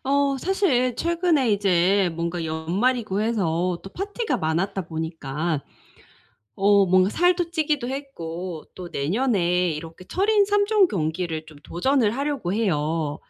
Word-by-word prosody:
어. 280 Hz, 0 st, +2 dB
사실 265 Hz, -, +1 dB
최근에 335 Hz, -7 st, +1 dB
이제 195 Hz, -1 st, +3 dB
뭔가 170 Hz, +1 st, -3 dB
연말이고 195 Hz, +7 st, 0 dB
해서 180 Hz, -5 st, 0 dB
또 195 Hz, -, -10 dB
파티가 405 Hz, -, -2 dB
많았다 170 Hz, +3 st, -1 dB
보니까 160 Hz, -2 st, -3 dB, 0.9 s
어 200 Hz, 0 st, +4 dB
뭔가 185 Hz, +1 st, +4 dB
살도 350 Hz, +2 st, +1 dB
찌기도 300 Hz, -6 st, 0 dB
했고 180 Hz, -, -6 dB
또 180 Hz, -2 st, -8 dB
내년에 180 Hz, -, +1 dB
이렇게 165 Hz, +4 st, -8 dB
철인 405 Hz, -, +2 dB
3 410 Hz, 0 st, +2 dB
종 420 Hz, -4 st, +4 dB
경기를 160 Hz, -, -2 dB
좀 155 Hz, -2 st, -14 dB
도전을 225 Hz, -, +1 dB
하려고 280 Hz, -10 st, -2 dB
해요. 160 Hz, -7 st, -1 dB
195 Hz, 260 characters per minute, -24 LUFS, 165-275 Hz, 0.9 s, 어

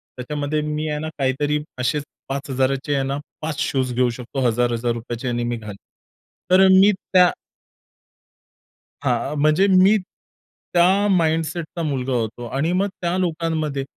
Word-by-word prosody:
त्याच्यामध्ये 145 Hz, +4 st, -2 dB
मी 150 Hz, +1 st, -3 dB
आहे 150 Hz, 0 st, -2 dB
ना 155 Hz, +1 st, -4 dB
काहीतरी 145 Hz, +2 st, 0 dB, 0.2 s
असेच 145 Hz, +3 st, 0 dB, 0.3 s
5,000चे 135 Hz, -1 st, -1 dB
आहे 135 Hz, 0 st, -1 dB
ना 135 Hz, +1 st, -2 dB, 0.2 s
5 155 Hz, -1 st, -4 dB
शूज 130 Hz, -5 st, 0 dB
घेऊ 125 Hz, 0 st, +2 dB
शकतो 125 Hz, +3 st, -6 dB
1,000, 120 Hz, +1 st, +1 dB
1,000 120 Hz, +1 st, -1 dB
रुपयाचे 120 Hz, +2 st, -5 dB
याने 120 Hz, 0 st, -1 dB
मी 120 Hz, 0 st, -2 dB
घालेल. 105 Hz, -3 st, -9 dB, 0.7 s
तर 185 Hz, +1 st, +6 dB
अ, -, -, +6 dB
मी 200 Hz, +2 st, +6 dB
त्या 185 Hz, -2 st, +3 dB, 1.7 s
हां, 130 Hz, +3 st, 0 dB
म्हणजे 155 Hz, +6 st, +4 dB
मी 190 Hz, +3 st, +5 dB, 0.8 s
त्या 185 Hz, +4 st, +4 dB
माइंडसेटचा 165 Hz, -1 st, 0 dB
मुलगा 135 Hz, -4 st, -2 dB
होतो 120 Hz, 0 st, -2 dB
आणि 155 Hz, +5 st, +1 dB
मग 195 Hz, +2 st, +1 dB
त्या 175 Hz, +1 st, 0 dB
लोकांमध्ये 160 Hz, -5 st, -1 dB
145 Hz, 145 wpm, -21 LUFS, 125-165 Hz, 1.7 s, तर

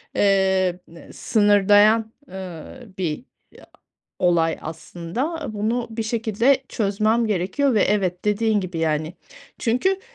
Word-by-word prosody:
emm, 190 Hz, -2 st, +2 dB, 0.2 s
eee, -, -, -14 dB
sınırlayan, 210 Hz, +1 st, +3 dB, 0.2 s
eee, 185 Hz, -4 st, -8 dB, 0.3 s
bir 175 Hz, +4 st, -3 dB, 1.0 s
olay 170 Hz, -2 st, +2 dB
aslında. 180 Hz, -, -5 dB
Bunu 225 Hz, +4 st, -1 dB
bir 225 Hz, 0 st, -4 dB
şekilde 230 Hz, +4 st, +1 dB
çözmem 215 Hz, +2 st, +1 dB
gerekiyor 215 Hz, +8 st, 0 dB
ve, 210 Hz, -, +3 dB
evet, 185 Hz, -3 st, 0 dB
dediğin 210 Hz, 0 st, +1 dB
gibi 185 Hz, -3 st, -5 dB
yani. 155 Hz, 0 st, -1 dB, 0.5 s
Çünkü 375 Hz, +12 st, +1 dB
205 Hz, 105 wpm, -22 LUFS, 180-225 Hz, 1.0 s, sınırlayan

